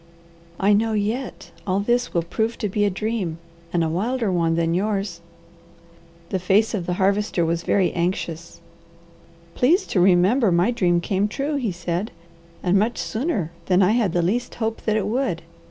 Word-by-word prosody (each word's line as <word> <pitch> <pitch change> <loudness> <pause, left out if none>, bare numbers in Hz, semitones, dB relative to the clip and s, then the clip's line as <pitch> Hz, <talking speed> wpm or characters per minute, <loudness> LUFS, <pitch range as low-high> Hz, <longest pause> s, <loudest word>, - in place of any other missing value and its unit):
I 200 +2 +4
know 220 +2 +2
yet 220 +5 -3 0.2
all 190 +1 +1
this 240 +4 0
will 170 - 0
prove 220 +7 -2
to 210 - -2
be 205 +1 0
a - - +3
dream 195 -4 -2 0.3
and 170 -1 +1
a - - +1
wilder 215 +6 -1
one 165 -2 +1
than 165 0 +1
yours." 195 -2 -1 1.1
The 190 - -1
face 200 +5 +2
of 185 -5 -3
the 180 - 0
Harvester 195 -1 +1
was 165 +1 0
very 190 +1 +2
anxious. 170 -1 -3 0.9
"Please 345 +10 +3
to 190 - 0
remember 190 +5 +4
my 175 +7 +3
dream 175 -7 +2
came 195 +3 0
true," 280 +7 -2
he 240 -7 -1
said, 175 +4 -3 0.5
"and 185 +2 +3
much 225 +4 0
sooner 220 - -2 0.2
than 185 +1 +4
I 185 - +4
had 220 -6 +1
the 175 - +1
least 240 +8 -1
hope 225 -1 -3
that 215 -1 +2
it 205 - -1
would. 220 -6 -1
195 Hz, 175 wpm, -23 LUFS, 175-225 Hz, 1.1 s, I